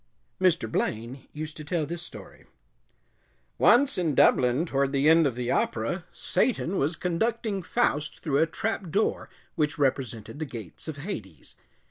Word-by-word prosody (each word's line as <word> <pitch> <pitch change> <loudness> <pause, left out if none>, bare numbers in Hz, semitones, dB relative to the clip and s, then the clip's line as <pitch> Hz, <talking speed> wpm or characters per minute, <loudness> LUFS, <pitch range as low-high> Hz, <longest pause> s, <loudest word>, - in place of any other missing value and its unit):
Mr. 170 -10 +3
Blaine 115 +4 -3
used 155 +1 -6
to 155 - -7
tell 160 0 -1
this 170 +3 -5
story: - - -12 1.1
Once 265 -2 +5
in 160 -5 0
Dublin, 125 +6 +4
toward 140 -4 0
the 140 +1 +3
end 165 -1 +6
of 130 - -3
the 125 0 -2
opera, 120 +11 -1
Satan 195 -7 0
was 150 +5 +1
conducting 200 +4 -1
Faust 150 -7 -1
through 140 -3 +1
a 165 - +4
trap 200 +1 -3
door 210 +7 0 0.2
which 150 -2 0
represented 130 -3 -1
the 155 - -2
gates 115 - -9
of 155 -2 -5
Hades. 110 - -7
155 Hz, 150 wpm, -27 LUFS, 135-175 Hz, 1.1 s, end